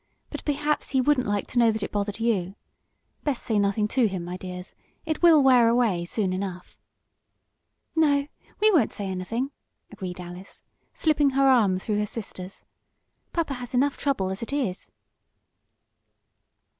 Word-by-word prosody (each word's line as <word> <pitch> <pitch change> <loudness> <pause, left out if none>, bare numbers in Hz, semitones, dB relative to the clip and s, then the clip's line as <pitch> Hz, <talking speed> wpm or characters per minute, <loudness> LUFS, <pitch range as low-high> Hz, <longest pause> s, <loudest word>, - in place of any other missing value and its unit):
But - - -6
perhaps 295 +1 0
he 265 - +1
wouldn't 255 -2 +2
like 205 -1 0
to 245 - 0
know 230 -1 +5
that 215 -1 -3
it - - -4
bothered 205 0 -2
you. 200 -5 0 0.7
Best 285 -5 -1
say 220 -3 +1
nothing 200 +1 +1
to 250 -2 +3
him, 185 -4 -4
my 180 +1 -5
dears. 180 0 -7 0.3
It 315 -1 -2
will 325 -4 +7
wear 250 -3 +6
away 225 -8 +2
soon 190 0 -1
enough." 185 -1 -5 1.2
"No, 285 -3 +3 0.3
we 430 +1 +5
won't 305 - +3
say 205 - -5
anything," 195 +8 -3 0.4
agreed 180 -2 -6
Alice, 180 +2 -9 0.3
slipping 300 -3 +3
her 275 0 +5
arm 220 -8 +4
through 210 +2 -2
her 210 - 0
sister's. 195 -4 -7 0.7
"Papa 330 -5 -1
has 250 -1 -6
enough 275 +3 +2
trouble 200 -10 -1
as 190 - -4
it 230 - -5
is." 255 -11 -2
225 Hz, 155 wpm, -26 LUFS, 190-275 Hz, 1.2 s, will